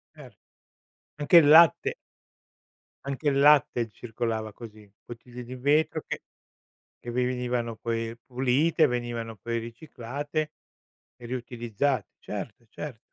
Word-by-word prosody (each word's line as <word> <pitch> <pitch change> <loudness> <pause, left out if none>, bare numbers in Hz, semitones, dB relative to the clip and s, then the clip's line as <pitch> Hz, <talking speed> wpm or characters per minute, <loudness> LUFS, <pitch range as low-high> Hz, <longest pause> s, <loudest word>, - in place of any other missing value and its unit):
Cer - - -13 0.9
anche 150 +4 +6
il 150 -3 +6
latte 160 +1 +6 1.1
anche 140 +2 -1
il 140 -1 +1
latte 140 -5 +4
circolava 110 -1 -4
così, 110 -2 -12 0.2
bottiglie 120 +1 -10
di 125 +2 -8
vetro 150 +4 +1
che - - -5 0.8
che 120 - -4
vi 125 +1 +1
venivano 125 -2 -2
poi 115 +1 -3
pulite, 135 +6 +2
venivano 120 -2 -3
poi 115 +3 -3
riciclate 140 +5 -5 0.6
e 120 - -13
riutilizzate. 120 -1 -2
Certo, 120 - -7
certo. 145 -2 -7
125 Hz, 115 wpm, -27 LUFS, 115-145 Hz, 1.1 s, anche